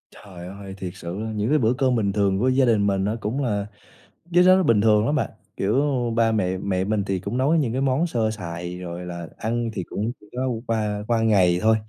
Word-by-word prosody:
Trời 90 Hz, -3 st, -11 dB
ơi! 95 Hz, 0 st, -9 dB
Thiệt 95 Hz, -2 st, -5 dB
sự 90 Hz, +1 st, -6 dB
á, 110 Hz, 0 st, -4 dB
những 105 Hz, +2 st, -1 dB
cái 155 Hz, -, +4 dB
bữa 115 Hz, -1 st, +2 dB
cơm 130 Hz, 0 st, +1 dB
bình 100 Hz, -4 st, 0 dB
thường 100 Hz, -2 st, +1 dB
của 125 Hz, -, +2 dB
gia 130 Hz, +1 st, +3 dB
đình 105 Hz, -4 st, +3 dB
mình 95 Hz, -1 st, +1 dB
nó 105 Hz, +3 st, 0 dB
cũng 120 Hz, +7 st, -2 dB
là 105 Hz, -5 st, -1 dB, 0.7 s
cái 175 Hz, +1 st, +6 dB
đó 185 Hz, +1 st, +7 dB
nó 190 Hz, -, +3 dB
bình 115 Hz, -, +3 dB
thường 105 Hz, 0 st, +4 dB
lắm 145 Hz, -, +1 dB
bạn, 145 Hz, -, 0 dB, 0.3 s
kiểu 100 Hz, +2 st, 0 dB, 0.4 s
ba 115 Hz, -1 st, +3 dB
mẹ 95 Hz, -4 st, 0 dB
mẹ 95 Hz, -1 st, -1 dB
mình 105 Hz, +1 st, 0 dB
thì 95 Hz, -1 st, -1 dB
cũng 100 Hz, +6 st, -4 dB
nấu 140 Hz, +5 st, +3 dB
những 145 Hz, -8 st, +1 dB
cái 130 Hz, -, -1 dB
món 135 Hz, +5 st, +1 dB
sơ 115 Hz, -8 st, 0 dB
sài 90 Hz, -3 st, -6 dB
rồi 90 Hz, 0 st, -6 dB
là 85 Hz, -1 st, -6 dB
ăn 115 Hz, +1 st, -2 dB
thì 95 Hz, -, -3 dB
cũng 105 Hz, +6 st, -3 dB
chỉ -, -, -19 dB
có 130 Hz, +1 st, -1 dB, 0.2 s
qua 105 Hz, -2 st, -1 dB
qua 115 Hz, -1 st, +2 dB
ngày 95 Hz, -6 st, +3 dB
thôi, 110 Hz, 0 st, +4 dB
105 Hz, 245 wpm, -23 LUFS, 95-120 Hz, 0.7 s, đó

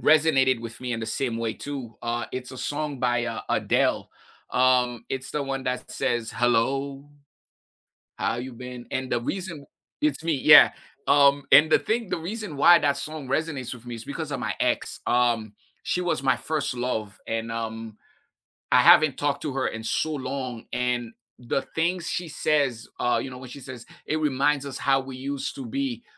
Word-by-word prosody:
resonated 145 Hz, -5 st, +4 dB
with 115 Hz, 0 st, -7 dB
me 125 Hz, -1 st, -3 dB
in 115 Hz, -, -3 dB
the 110 Hz, -, -4 dB
same 120 Hz, -2 st, -1 dB
way 115 Hz, -1 st, -2 dB
too. 135 Hz, -5 st, -7 dB
Uh, 120 Hz, 0 st, -2 dB
it's 125 Hz, 0 st, -5 dB
a 130 Hz, -, -8 dB
song 145 Hz, 0 st, -2 dB
by, 120 Hz, -1 st, +1 dB
uh, 120 Hz, -, -4 dB
Adele, -, -, +1 dB, 0.4 s
um, 125 Hz, -2 st, +2 dB
it's 130 Hz, 0 st, -4 dB
the 150 Hz, -, -1 dB
one 135 Hz, -1 st, -3 dB
that 125 Hz, 0 st, -3 dB
says, 120 Hz, -2 st, -1 dB
"Hello, 135 Hz, +4 st, 0 dB, 1.1 s
how -, -, -1 dB
you 125 Hz, +1 st, -6 dB
been?" 125 Hz, 0 st, -8 dB
And 130 Hz, 0 st, -3 dB
the 120 Hz, -, +1 dB
reason 170 Hz, +2 st, -4 dB, 0.4 s
it's 300 Hz, -, 0 dB
me. 165 Hz, -, +1 dB
Yeah, 150 Hz, +2 st, +8 dB, 0.3 s
um, 140 Hz, 0 st, +5 dB
and 155 Hz, +2 st, +8 dB
the -, -, +6 dB
thing 225 Hz, -1 st, -1 dB
the -, -, -1 dB
reason 190 Hz, 0 st, -5 dB
why 170 Hz, +5 st, +7 dB
that 140 Hz, -1 st, +2 dB
song 155 Hz, -3 st, -6 dB
resonates 140 Hz, -3 st, -2 dB
with 120 Hz, -1 st, -13 dB
me 120 Hz, -, -5 dB
is 115 Hz, -, -9 dB
because 150 Hz, +1 st, -5 dB
of 135 Hz, -, -3 dB
my -, -, -2 dB
ex. -, -, 0 dB
Um, 120 Hz, -3 st, +1 dB, 0.3 s
she 180 Hz, -, 0 dB
was 175 Hz, -7 st, -1 dB
my 135 Hz, -, +3 dB
1st 145 Hz, -4 st, -2 dB
love 110 Hz, -4 st, -3 dB
and, 115 Hz, 0 st, -3 dB
um, 115 Hz, -1 st, -5 dB, 0.7 s
I -, -, +7 dB
haven't 155 Hz, -3 st, +7 dB
talked 145 Hz, -1 st, -1 dB
to 150 Hz, -, -3 dB
her 135 Hz, -1 st, 0 dB
in 110 Hz, 0 st, -6 dB
so 155 Hz, +7 st, 0 dB
long 130 Hz, -3 st, -4 dB
and 125 Hz, -2 st, -1 dB, 0.3 s
the 125 Hz, +2 st, -1 dB
things 170 Hz, +1 st, 0 dB
she 175 Hz, -, -2 dB
says, 140 Hz, -7 st, 0 dB
uh, 120 Hz, -, +2 dB
you 135 Hz, -, -6 dB
know, 125 Hz, -, -9 dB
when 130 Hz, -, -10 dB
she 140 Hz, -, -9 dB
says, 125 Hz, -2 st, -9 dB, 0.2 s
"it 155 Hz, -, 0 dB
reminds 145 Hz, -1 st, +1 dB
us 135 Hz, -2 st, -5 dB
how 135 Hz, -1 st, +3 dB
we 130 Hz, -1 st, -8 dB
used 140 Hz, +1 st, -4 dB
to 275 Hz, -1 st, -7 dB
be." 255 Hz, 0 st, -3 dB
130 Hz, 190 wpm, -25 LUFS, 120-150 Hz, 1.1 s, Yeah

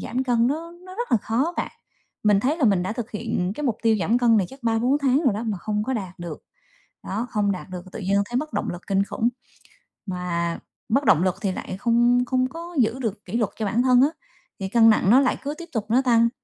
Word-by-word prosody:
giảm 255 Hz, +3 st, -2 dB
cân 240 Hz, -2 st, +2 dB
nó 325 Hz, +5 st, -3 dB
nó 370 Hz, -, -10 dB
rất 480 Hz, +3 st, -4 dB
là -, -, +7 dB
khó 265 Hz, +10 st, 0 dB
bạn. -, -, -2 dB, 0.5 s
Mình 205 Hz, -2 st, +4 dB
thấy 285 Hz, +7 st, +1 dB
là 290 Hz, -, +1 dB
mình 195 Hz, -5 st, +3 dB
đã 190 Hz, -, -2 dB
thực 240 Hz, -1 st, -5 dB
hiện 210 Hz, -4 st, -2 dB
cái 295 Hz, -, -5 dB
mục 230 Hz, -5 st, 0 dB
tiêu 225 Hz, -2 st, +3 dB
giảm 220 Hz, +8 st, +2 dB
cân 235 Hz, -2 st, +4 dB
này 195 Hz, -4 st, +2 dB
chắc 265 Hz, -1 st, -14 dB
3-4 235 Hz, +5 st, +2 dB
tháng 275 Hz, +2 st, +2 dB
rồi 230 Hz, -6 st, +3 dB
đó 215 Hz, -, -3 dB
mà 215 Hz, -5 st, -2 dB
không 210 Hz, +2 st, -2 dB
có 265 Hz, -, -2 dB
đạt 190 Hz, -6 st, -5 dB
được, 170 Hz, -3 st, -7 dB, 0.7 s
đó, 225 Hz, +5 st, -2 dB
không 205 Hz, -1 st, +1 dB
đạt 185 Hz, 0 st, -6 dB
được 180 Hz, -1 st, -6 dB
tự -, -, -7 dB
nhiên 195 Hz, +1 st, +1 dB
thấy 240 Hz, +4 st, -7 dB
mất 305 Hz, +3 st, -4 dB
động -, -, -1 dB
lực 175 Hz, +1 st, -7 dB
kinh 195 Hz, 0 st, +2 dB
khủng, 225 Hz, +3 st, -1 dB, 0.8 s
mà 175 Hz, -2 st, -2 dB, 0.3 s
mất 270 Hz, +5 st, +2 dB
động 175 Hz, -3 st, +5 dB
lực 185 Hz, -1 st, +1 dB
thì 195 Hz, -3 st, 0 dB
lại 185 Hz, 0 st, -6 dB
không 240 Hz, +2 st, +3 dB
không 255 Hz, 0 st, +1 dB
có 335 Hz, +4 st, -9 dB
giữ 240 Hz, +2 st, +2 dB
được 215 Hz, -4 st, -4 dB
kỷ 205 Hz, +6 st, -3 dB
luật 220 Hz, -, +1 dB
cho 220 Hz, -, -2 dB
bản 225 Hz, +4 st, +1 dB
thân 255 Hz, -1 st, +5 dB
á, 275 Hz, -, +6 dB, 0.5 s
thì 190 Hz, -, -3 dB
cân 225 Hz, +1 st, +6 dB
nặng 215 Hz, -3 st, +3 dB
nó 255 Hz, +4 st, +7 dB
lại 265 Hz, -, +1 dB
cứ 285 Hz, -, -3 dB
tiếp 340 Hz, 0 st, -9 dB
tục 220 Hz, -4 st, -2 dB
nó 245 Hz, +4 st, +4 dB
tăng. 235 Hz, -2 st, +4 dB
230 Hz, 255 wpm, -24 LUFS, 200-255 Hz, 0.8 s, là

